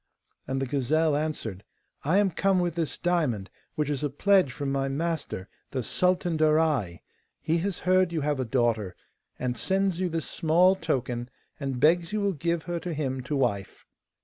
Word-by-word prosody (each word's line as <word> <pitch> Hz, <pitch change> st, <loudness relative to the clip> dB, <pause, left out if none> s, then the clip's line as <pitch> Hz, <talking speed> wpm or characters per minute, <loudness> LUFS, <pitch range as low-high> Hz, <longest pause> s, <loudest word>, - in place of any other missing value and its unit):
And 135 Hz, 0 st, -1 dB
the 135 Hz, -, 0 dB
gazelle 145 Hz, +4 st, +1 dB
answered: 145 Hz, -10 st, -3 dB, 0.4 s
'I 160 Hz, +7 st, +2 dB
am 200 Hz, -2 st, +3 dB
come 195 Hz, +3 st, +2 dB
with 175 Hz, -2 st, 0 dB
this 165 Hz, -2 st, -2 dB
diamond, 150 Hz, -, 0 dB, 0.2 s
which 150 Hz, -1 st, 0 dB
is 145 Hz, -1 st, -2 dB
a 145 Hz, -, +1 dB
pledge 185 Hz, +1 st, +3 dB
from 140 Hz, +3 st, -3 dB
my 135 Hz, 0 st, 0 dB
master 145 Hz, -, -3 dB, 0.2 s
the 130 Hz, -2 st, -3 dB
Sultan 175 Hz, +3 st, +1 dB
Darai. 155 Hz, -, +2 dB, 0.4 s
He 165 Hz, +2 st, 0 dB
has 195 Hz, +2 st, -2 dB
heard 185 Hz, -1 st, +3 dB
you 165 Hz, -2 st, -1 dB
have 145 Hz, -1 st, 0 dB
a -, -, +1 dB
daughter, 115 Hz, -6 st, 0 dB, 0.4 s
and 125 Hz, -1 st, -2 dB
sends 190 Hz, 0 st, 0 dB
you 185 Hz, -1 st, 0 dB
this 165 Hz, -1 st, -2 dB
small 175 Hz, +4 st, +3 dB
token, 125 Hz, -7 st, -2 dB, 0.3 s
and 135 Hz, -3 st, -3 dB
begs 170 Hz, +6 st, +3 dB
you 215 Hz, -, +1 dB
will 200 Hz, -1 st, +1 dB
give 170 Hz, +1 st, -1 dB
her 175 Hz, 0 st, -3 dB
to 170 Hz, -1 st, -4 dB
him 135 Hz, -3 st, -2 dB
to 130 Hz, +4 st, -3 dB
wife. 105 Hz, -8 st, -1 dB
155 Hz, 180 wpm, -27 LUFS, 130-175 Hz, 0.4 s, am